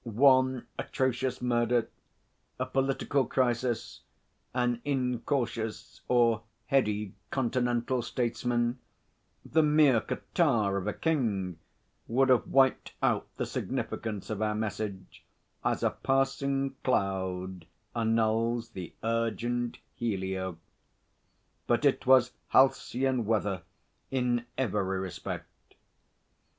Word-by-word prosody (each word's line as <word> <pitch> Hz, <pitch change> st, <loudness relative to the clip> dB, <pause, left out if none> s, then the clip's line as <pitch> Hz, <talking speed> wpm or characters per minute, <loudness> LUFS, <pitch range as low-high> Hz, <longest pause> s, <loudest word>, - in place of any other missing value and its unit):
One 130 Hz, +2 st, +4 dB
atrocious 130 Hz, -1 st, -1 dB
murder, 120 Hz, -1 st, +2 dB, 0.7 s
a 130 Hz, -, 0 dB
political 135 Hz, +1 st, +1 dB
crisis, 120 Hz, -2 st, 0 dB, 0.5 s
an 120 Hz, -1 st, 0 dB
incautious 125 Hz, -4 st, -2 dB
or 115 Hz, -3 st, +3 dB, 0.2 s
heady 105 Hz, -7 st, +1 dB, 0.2 s
continental 120 Hz, -1 st, 0 dB
statesman, 120 Hz, +1 st, -1 dB, 0.7 s
the 160 Hz, -, +3 dB
mere 150 Hz, -6 st, +5 dB
catarrh 115 Hz, -, +1 dB
of 95 Hz, -, -5 dB
a 105 Hz, -, 0 dB
king, 105 Hz, -, -1 dB, 0.5 s
would 130 Hz, +3 st, +3 dB
have 125 Hz, -2 st, +4 dB
wiped 135 Hz, -1 st, +3 dB
out -, -, +2 dB
the -, -, -1 dB
significance 110 Hz, -2 st, -3 dB
of 110 Hz, -1 st, -3 dB
our 105 Hz, -1 st, +1 dB
message, 105 Hz, -3 st, -4 dB, 0.4 s
as -, -, 0 dB
a -, -, +3 dB
passing 135 Hz, 0 st, 0 dB
cloud 95 Hz, -5 st, -1 dB, 0.3 s
annuls 115 Hz, +1 st, +1 dB
the 90 Hz, -5 st, -8 dB
urgent 115 Hz, +1 st, -1 dB, 0.2 s
helio. 95 Hz, -5 st, -2 dB, 1.1 s
But -, -, +2 dB
it -, -, +2 dB
was 130 Hz, -2 st, +6 dB, 0.2 s
halcyon 130 Hz, -1 st, +3 dB
weather 100 Hz, -4 st, 0 dB, 0.5 s
in 120 Hz, -2 st, 0 dB
every 100 Hz, -6 st, 0 dB
respect. 95 Hz, -1 st, -7 dB
120 Hz, 95 wpm, -29 LUFS, 110-130 Hz, 1.1 s, was